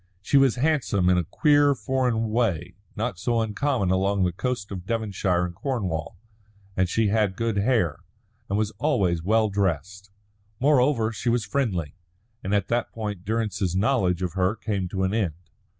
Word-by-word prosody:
She 140 - 0
was 135 -3 +4
handsome 125 - +1
in 90 - +3
a - - 0
queer, 145 - +3
foreign 125 -4 0
way 95 -8 0 0.2
not 105 -5 -3
so 115 +3 0
uncommon 110 -2 0
along 95 +1 +1
the 90 - +1
coasts 115 +2 -3
of 95 -1 -7
Devonshire 100 -6 0
and 90 - -6
Cornwall, 95 - -3 0.6
and 95 -1 +1
she 110 +2 +1
had 105 -3 +1
good 115 0 -1
hair, 100 - +1 0.5
and 100 - 0
was 105 -1 0
always 95 - +1
well 110 +5 +2
dressed. 95 +1 -2 0.5
Moreover, 130 -4 +3
she 115 +2 -2
was 115 -3 +1
friendly. 100 - -1 0.5
And 95 - -3
at 100 -2 +1
that 120 0 0
point 105 -5 -5
Durrance's 100 -4 -1
knowledge 95 -5 +1
of 90 -3 -2
her 95 +2 +1
came 100 -5 -2
to 95 0 -2
an 95 +1 0
end. 100 -9 0
105 Hz, 165 wpm, -25 LUFS, 95-120 Hz, 0.6 s, was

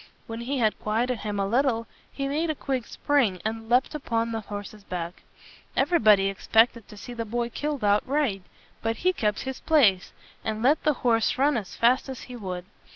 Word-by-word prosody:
When 230 +1 -6
he 270 +4 -2
had 220 -4 +1
qui 215 +2 0
et 250 - -1
ed 245 - -3
him 205 -1 -3
a 195 - +1
little, 230 +1 +1 0.3
he 275 -1 -3
made 310 +4 -1
a 310 - 0
quick 265 -4 -3
spring, 245 -11 +1
and 225 0 -3
leaped 250 +2 +3
upon 230 -6 -1
the 225 - -2
horse's 205 0 -8
back. 175 -2 -5 0.6
Everybody 215 - +5
expected 225 +3 +2
to 210 - -12
see 245 - -8
the 230 -1 -3
boy 235 +2 -2
killed 295 0 -3
outright. 210 +1 +1 0.4
But 225 0 0
he 370 - +5
kept 210 - 0
his 265 -1 -5
place, 220 - +3 0.3
and 220 0 -3
let 290 +5 +4
the 305 - +3
horse 225 -1 +3
run 285 +2 +3
as 210 -6 -4
fast 250 +4 +3
as 260 - -6
he 250 - -9
would. 185 -5 -5
230 Hz, 200 wpm, -26 LUFS, 210-265 Hz, 0.6 s, Everybody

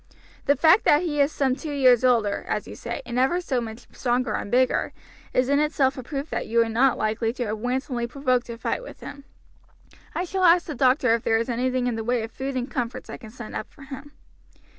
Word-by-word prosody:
The 285 - +5
fact 320 +8 +5
that 295 +4 +5
he 295 -4 0
is 280 +2 +3
some 265 -4 +1
two 300 +1 -6
years 255 -3 +5
older, 230 -5 +2
as 210 - -2
you - - -8
say, 235 +4 -6
and 240 +1 -2
ever 270 +8 +2
so 265 -8 -1
much 225 0 -8
stronger 250 0 -1
and - - -3
bigger, 255 +2 +2 0.4
is 255 0 +2
in 285 +1 +3
itself 295 -3 +2
a 260 - -6
proof 275 +4 -5
that - - -3
you 230 - -2
were 230 -1 +4
not 245 +3 +3
likely 220 +1 0
to 245 -1 -3
have 215 0 -3
wantonly 245 0 -2
provoked 255 -2 0
a 230 - -6
fight 235 - -2
with - - -11
him. 280 -1 -9 0.9
I - - 0
shall 375 +1 -2
ask 345 0 +6
the 310 - -5
doctor 255 -3 +3
if 230 - +1
there 225 - +2
is 230 +2 -2
anything 250 +1 0
in 240 -2 -1
the 225 - -3
way 240 0 0
of 225 - -6
food 270 0 -4
and 250 -1 -2
comforts 245 -2 -4
I - - -6
can 220 - -12
send 240 0 -9
up 215 - -5
for 285 - -16
him." 275 +1 -10
255 Hz, 240 wpm, -24 LUFS, 235-280 Hz, 0.9 s, ask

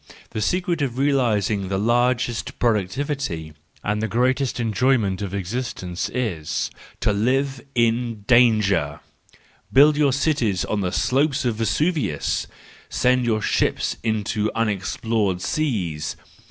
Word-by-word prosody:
—the 110 - -3
secret 175 - 0
of 130 -3 -1
realising 115 -8 +1
the 95 0 -1
largest 120 +2 0
productivity 110 - -1 0.3
and 105 +1 -1
the 110 - 0
greatest 125 +3 +1
enjoyment 115 -4 +1
of 100 -3 -3
existence 95 -3 -3
is 90 -12 -2 0.3
to 105 - +1
live 130 +5 0
in 115 -1 +1
danger 105 - +4
l 75 - -16 0.7
Build 145 +3 +6
your 145 -2 +3
cities 130 - +1
on 105 - -1
the 90 -2 -1
slope 135 - +2
of 115 -3 0
Vesuvius! 115 - 0 0.4
Send 125 0 +2
your 110 -2 0
ships - - 0
into 110 -1 -1
unexplored 105 -2 0
seas 90 - -2
115 Hz, 120 wpm, -23 LUFS, 100-130 Hz, 0.7 s, Build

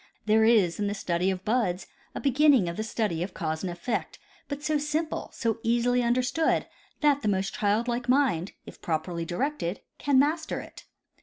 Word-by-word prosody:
There 220 +1 +4
is 210 -7 +4
in 205 - 0
the 205 - -2
study 180 -1 0
of 190 0 -3
buds 210 -6 0 0.3
a - - -3
beginning 275 - +4
of 170 - -3
the 215 - -3
study 215 -6 -2
of 180 +1 -4
cause 160 -2 -2
and 185 - -3
effect, 175 +7 -3 0.3
but 285 0 -5
so 305 0 +1
simple, 300 +2 -2
so 230 -2 -2
easily 240 +2 +2
understood, 250 +6 +1 0.4
that 290 -1 +3
the 215 - -2
most 195 -1 0
childlike 235 +4 0
mind, 250 - +2
if - - -12
properly 165 +1 -2
directed, 180 - -2 0.2
can 280 -2 +2
master 310 +4 +1
it. - - -11
225 Hz, 175 wpm, -27 LUFS, 180-270 Hz, 0.4 s, There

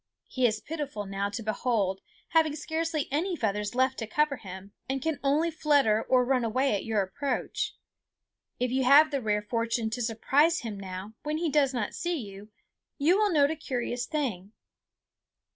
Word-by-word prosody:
He 255 -2 +2
is 215 -1 -1
pitiful 290 -10 -5
now 195 +1 -2
to 205 +3 -5
behold, 210 -3 0 0.3
having 315 -2 +3
scarcely 320 0 -2
any 345 +6 0
feathers 210 -4 -2
left 260 +1 +2
to 225 - -4
cover 300 +4 +1
him, 190 -1 -10 0.2
and 270 0 0
can 315 +2 -2
only 300 +5 +2
flutter 285 -9 +3
or 250 +1 +3
run 255 -1 +2
away 255 +4 +1
at 200 - -1
your 220 -3 +1
approach. 285 - -3 0.8
If 250 -1 0
you 265 +1 +1
have 290 +4 +7
the 280 -2 -1
rare 210 -2 0
fortune 230 0 -1
to 245 - -3
surprise 275 +9 +2
him 220 -5 -6
now 190 +2 -7
when 300 +1 -2
he 325 -2 -1
does 280 -3 +3
not 240 -6 -2
see 345 -1 -2
you, 205 -4 -9 0.5
you 315 +5 +4
will 415 0 +2
note 290 -2 +4
a - - -2
curious 245 -4 -3
thing. 225 - -3
255 Hz, 175 wpm, -28 LUFS, 215-300 Hz, 0.8 s, have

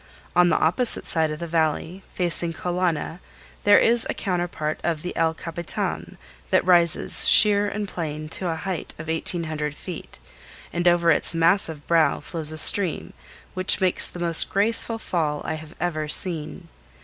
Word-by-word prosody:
On 180 0 +3
the - - 0
opposite 225 +10 -1
side 160 -1 -1
of 155 - -6
the 170 - -7
Valley, 165 +2 -3
facing 170 -1 -1
Kolana, 175 -1 -4 0.5
there 205 0 +5
is 235 0 +2
a - - -4
counterpart 175 -4 -4
of 165 -3 -4
the 180 - -7
El 160 0 -1
Capitan 170 0 -7 0.3
that - - 0
rises 175 -2 +2
sheer 205 -1 +5
and 210 0 -6
plain 155 -4 -7
to 180 +2 -4
a 165 - -3
height 180 +2 -7
of 155 +1 -10
1800 160 -2 -3
feet, 180 0 -11 0.6
and 175 +1 -2
over 170 -1 +2
its 165 - +1
massive 165 -3 -1
brow 165 -3 +1
flows 160 -3 +2
a 155 - -7
stream 180 +2 +7 0.4
which 185 +1 0
makes 185 -2 +2
the - - -11
most 170 -2 +4
graceful 225 +3 0
fall 155 -8 -4
I - - -4
have 155 +1 -11
ever 155 -3 -4
seen. 160 -1 +1
170 Hz, 160 wpm, -21 LUFS, 160-180 Hz, 0.6 s, stream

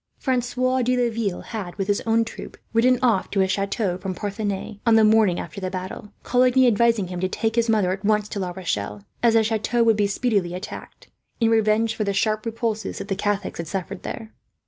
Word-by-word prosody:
Francois 255 0 0
de 250 +1 +1
Laville 230 -6 -1
had, 200 -6 -6
with 195 -2 -3
his 205 0 +1
own 225 0 +3
troop, - - -9 0.2
ridden 250 +3 +4
off 225 -7 +2
to 200 - -1
his 190 0 +2
chateau 195 -2 -1
from 185 -1 -4
Parthenay 205 +1 -4
on 230 -2 +4
the 220 - +6
morning 215 -4 +4
after 200 - -7
the 185 - -2
battle; 185 +2 -6
Coligny 255 +1 +4
advising 230 -4 +3
him 180 -1 -4
to 185 +1 -1
take 225 +3 -1
his 235 -1 +2
mother, 210 -5 +2
at 190 +2 -4
once, 210 0 +2
to 205 - -4
La 185 -2 -2
Rochelle, 105 - -4 0.2
as 230 -1 +4
the 225 - +5
chateau 225 +2 +1
would 210 -3 +3
speedily 215 0 +1
be 175 - -6
attacked, 185 +3 -9 0.3
in 230 -1 +3
revenge 220 0 +2
for 220 - -2
the 200 -1 -1
sharp 215 +2 0
repulse 225 -1 -2
that 195 - -6
the 195 - 0
Catholics 205 -1 -2
had 170 - -4
suffered 190 +2 -4
there. 220 0 -7
215 Hz, 215 wpm, -23 LUFS, 195-230 Hz, 0.3 s, the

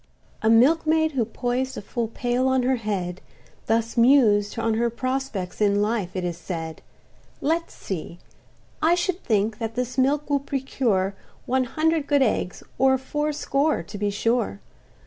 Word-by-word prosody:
A 220 - +2
milkmaid, 315 +6 +4
who 255 -6 0
poized 245 +3 -2
a - - -4
full 235 +2 -2
pail 245 +3 0
on 260 -1 +2
her 260 +1 +2
head, 190 -5 -3 0.5
Thus 230 +1 +1
mused 230 -5 +4
on 225 -1 +1
her 235 +2 +1
prospects 240 -6 -3
in 205 -1 +3
life, 210 -3 -1
it 185 - -2
is 175 -1 -3
said: 165 -2 -5 0.6
"Let's 330 +3 -1
see—I 190 - -4
should 355 +1 -2
think 215 0 0
that 225 -1 -4
this 250 +1 -2
milk 285 +3 +2
will 285 -1 +2
procure 255 -8 -1 0.3
One 260 0 +1
hundred 315 +2 0
good 285 -2 +4
eggs, 210 -6 -1 0.2
or 265 0 +5
fourscore 295 - -1
to 205 +5 -8
be 205 0 +1
sure. 225 - 0
240 Hz, 150 wpm, -24 LUFS, 205-275 Hz, 0.6 s, or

